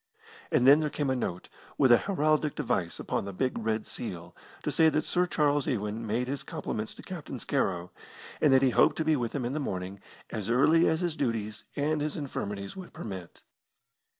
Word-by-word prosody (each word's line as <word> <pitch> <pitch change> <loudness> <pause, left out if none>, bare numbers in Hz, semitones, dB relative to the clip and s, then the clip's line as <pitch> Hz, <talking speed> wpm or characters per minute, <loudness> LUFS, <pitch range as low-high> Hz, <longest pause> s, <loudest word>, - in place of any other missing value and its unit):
And 125 - +3
then 140 +3 +8
there 155 -1 0
came 145 -2 -1
a - - +1
note, 90 -7 -3 0.3
with 130 -3 +5
a 120 - +8
heraldic 155 -5 +1
device - - -1
upon - - -2
the 100 - -4
big 130 +6 -1
red 110 -1 -1
seal, - - -6 0.3
to - - -1
say 160 -1 +5
that 155 0 0
Sir 180 +1 +1
Charles 145 -4 +1
Ewan 110 -1 -2
made 120 +4 0
his 140 0 -3
compliments 110 0 -4
to - - -12
Captain 170 -8 -6
Scarrow, 90 -6 -1 0.5
and 150 - +5
that 135 0 +5
he 130 - +4
hoped - - +4
to 160 - -1
be 155 0 +4
with 120 -2 -2
him 130 -4 -1
in 125 - -2
the 155 - -1
morning 95 -6 -4 0.3
as 105 -2 -3
early 155 +8 +5
as 160 +2 0
his 175 -3 -1
duties 110 -6 -2
and 150 +1 0
his 150 0 -2
infirmities 100 -9 -4
would 185 -2 -9
permit. 95 -5 -8
130 Hz, 205 wpm, -29 LUFS, 110-155 Hz, 0.5 s, then